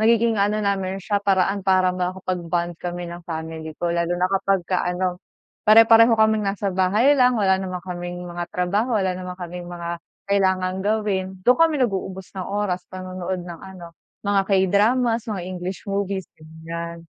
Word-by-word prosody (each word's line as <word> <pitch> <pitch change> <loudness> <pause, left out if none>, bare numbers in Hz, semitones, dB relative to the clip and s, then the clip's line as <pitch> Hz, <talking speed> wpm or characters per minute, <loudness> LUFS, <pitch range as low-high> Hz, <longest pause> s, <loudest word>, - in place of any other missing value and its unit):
nagiging 225 -1 +3
ano 210 +1 +1
namin 195 -1 -1
siya 200 +1 -1
paraan 195 0 +2
para 185 -1 +3
makapag-bond 180 -1 -2
kami 175 0 -4
ng 175 0 -7
family 160 -1 -6
ko 170 -1 -1
lalo 170 +1 0
na 180 - +1
kapag 195 -1 +2
ka 185 0 0
ano, 180 0 -2 0.5
pare-pareho 225 +1 +7
kaming 220 0 +3
nasa 200 0 -2
bahay 200 +9 +3
lang, 250 -2 +4
wala 190 -3 +2
naman 185 -1 -4
kaming 175 0 -5
mga 175 0 -4
trabaho, 205 +7 0
wala 190 -2 +1
naman 180 0 -6
kaming 175 0 -7
mga 170 -1 -5 0.3
kailangang 190 -1 +1
gawin. 205 -3 0 0.2
'Dun 250 - +7
kami 325 -2 +4
nag-uubos 190 -3 -4
ng 185 -2 -4
oras, 200 -3 -1
panonood 185 -1 -5
ng 170 -2 -9
ano, 180 -3 -11 0.3
mga 200 -1 +3
K-dramas, 220 +5 +2
mga 195 -4 -3
English 185 0 -5
movies, 195 -1 -2 0.2
ganyan. 165 +1 -7
185 Hz, 160 wpm, -23 LUFS, 175-205 Hz, 0.5 s, pare-pareho